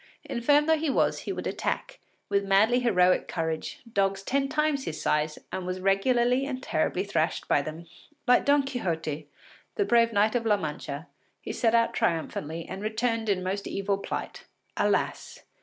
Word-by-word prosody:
Infirm 290 +5 +3
though 320 0 +3
he 315 -1 0
was, - - +2
he - - -5
would - - -5
attack, - - -3 0.3
with 200 0 +1
madly 205 +5 +4
heroic 185 -7 +3
courage, 160 -2 -3
dogs 195 0 +1
ten 275 +5 0
times 300 -2 0
his 155 - -4
size 150 0 0
and 185 -1 -4
was 185 0 -3
regularly 240 +7 +2
and 260 -2 -4
terribly 180 +4 0
thrashed 175 -5 -1
by 145 - +3
them. 155 +3 -7 0.4
Like 250 - +5
Don 285 0 +4
Quixote, 160 - -3 0.5
the 410 - +1
brave 235 -4 +4
Knight 215 0 +3
of 245 -2 0
La 210 -1 +4
Mancha, 150 -1 -5 0.3
he - - -6
set 230 -2 +2
out 230 0 +3
triumphantly 165 0 -2
and 195 - -6
returned 225 +1 -1
in 185 -2 +1
most 195 +2 -3
evil 195 0 -1
plight. - - -5 0.3
Alas! 475 +1 -1
200 Hz, 170 wpm, -27 LUFS, 180-250 Hz, 0.5 s, Like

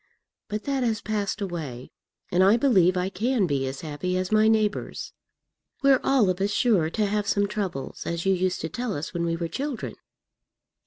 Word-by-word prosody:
But 210 0 -4
that 275 -1 -1
has 225 -3 +1
passed 210 -1 -2
away, 155 -10 -5 0.4
and 180 +1 +4
I 200 +4 +6
believe 190 -9 +4
I 180 +1 0
can 220 +3 +1
be 140 -5 0
as 135 +1 -5
happy 160 +4 -2
as 185 +1 -2
my 215 0 +5
neighbours. 215 -1 0 0.7
We're 275 -2 +6
all 265 -7 +3
of 180 +1 -5
us 200 - +2
sure 205 -7 +2
to 210 +5 0
have 205 0 -1
some 200 0 +2
troubles, 195 - -4
as 170 +1 -2
you 195 - +4
used 185 0 0
to 160 - -3
tell 240 +4 -3
us 145 - -5
when 170 0 -1
we 165 0 0
were 170 0 -3
children." 270 - -4
195 Hz, 195 wpm, -26 LUFS, 170-215 Hz, 0.7 s, I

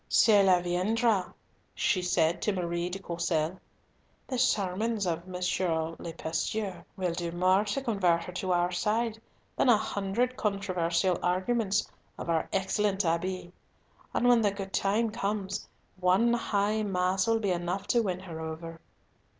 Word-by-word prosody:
"Cela 195 -5 +5
viendra," 195 +4 +1 0.4
she 185 - +1
said 170 -2 +1
to 210 - +1
Marie 175 -2 -2
de 185 - -4
Courcelles. 170 -1 -2 0.7
"The 255 -2 -3
sermons 210 -1 +1
of 170 0 -2
M. 180 -1 -6 0.6
le 165 - -6
Pasteur 190 +5 -3
will 180 -3 -1
do 170 0 -3
more 185 +3 +3
to 260 +6 -2
convert 185 -8 +2
her 180 - -7
to 185 +1 -2
our 175 0 +2
side 220 +5 -1 0.3
than - - +2
a 235 - +7
hundred 215 +5 -1
controversial 185 -3 0
arguments 200 +3 +1 0.3
of 170 - -3
our 165 -1 0
excellent 195 0 0
Abbe; 175 +2 -1 0.6
and 245 - +1
when 240 -2 +6
the 210 - +3
good 195 -1 -6
time 215 +3 +1
comes, 200 -3 -3 0.3
one 185 +6 +3
High 210 -2 +1
Mass 185 -1 +1
will 225 0 +3
be 205 -3 0
enough 180 +2 -2
to 240 - +4
win 185 -4 -2
her 170 -4 -8
over." 165 +1 -7
190 Hz, 150 wpm, -29 LUFS, 175-210 Hz, 0.7 s, a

